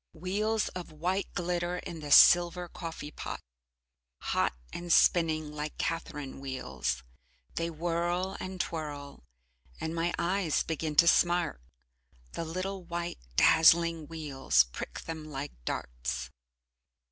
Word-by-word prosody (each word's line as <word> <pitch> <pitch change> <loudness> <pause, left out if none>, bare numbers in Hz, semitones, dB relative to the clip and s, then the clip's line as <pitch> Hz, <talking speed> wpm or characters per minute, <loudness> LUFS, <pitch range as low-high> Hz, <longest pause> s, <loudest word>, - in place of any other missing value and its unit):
Wheels 210 +6 -1
of 180 -3 -7
white 180 +6 -2
glitter 175 0 -1
in 170 -2 -7
the 150 -1 -7
silver 175 +3 +7
coffee 165 -3 -7
pot, - - -6 0.8
hot - - 0 0.2
and 175 0 -4
spinning 160 -3 +4
like 150 0 -5
catherine 150 -5 -3
wheels, 65 - -3 0.5
they 165 0 -1
whirl, 175 +3 -1
and 185 0 -6
twirl 145 -4 -5 0.6
and 160 - -3
my 170 +1 0
eyes 175 -2 +1
begin 160 -1 -3
to 170 +3 +7
smart, 175 - +3 0.7
the - - -4
little 185 +3 -4
white, 170 0 -4 0.2
dazzling 165 - +5
wheels 140 - +2
prick - - -6
them 160 -1 -7
like 140 0 -5
darts. - - -4
165 Hz, 120 wpm, -30 LUFS, 150-175 Hz, 0.8 s, silver